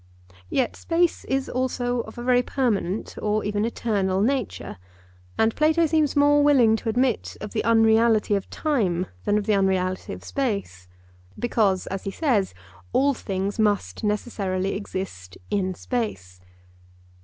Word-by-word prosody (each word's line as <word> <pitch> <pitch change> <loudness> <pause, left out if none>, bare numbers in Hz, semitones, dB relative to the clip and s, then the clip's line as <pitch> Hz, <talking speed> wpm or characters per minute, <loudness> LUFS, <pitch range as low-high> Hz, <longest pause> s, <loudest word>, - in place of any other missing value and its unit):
Yet 255 -3 0
space 340 0 0
is 270 0 -1
also 245 -1 -1
of 220 -1 -6
a 240 - -5
very 250 0 +4
permanent 225 -7 -1
or 215 0 0
even 205 +1 0
eternal 200 -5 0
nature; 235 - -2 0.6
and 220 0 +2
Plato 315 +2 +3
seems 310 -2 +1
more 290 0 +5
willing 255 -7 +5
to 225 - -4
admit 245 +1 0
of 210 - -7
the 220 - -1
unreality 225 -1 +4
of 200 -1 -1
time 200 - 0 0.2
than 205 - +2
of 210 - -1
the 215 - +2
unreality 185 -1 0
of 90 - -9
space; 200 - -3 0.5
because, 210 -6 +1
as 195 0 -5
he - - -1
says, 210 - 0 0.4
all 280 +1 +3
things 195 -3 -3
must 205 - 0
necessarily 200 -3 -1
exist 185 - -6
in 185 -2 0
space. 95 - -4
215 Hz, 145 wpm, -24 LUFS, 195-250 Hz, 0.6 s, more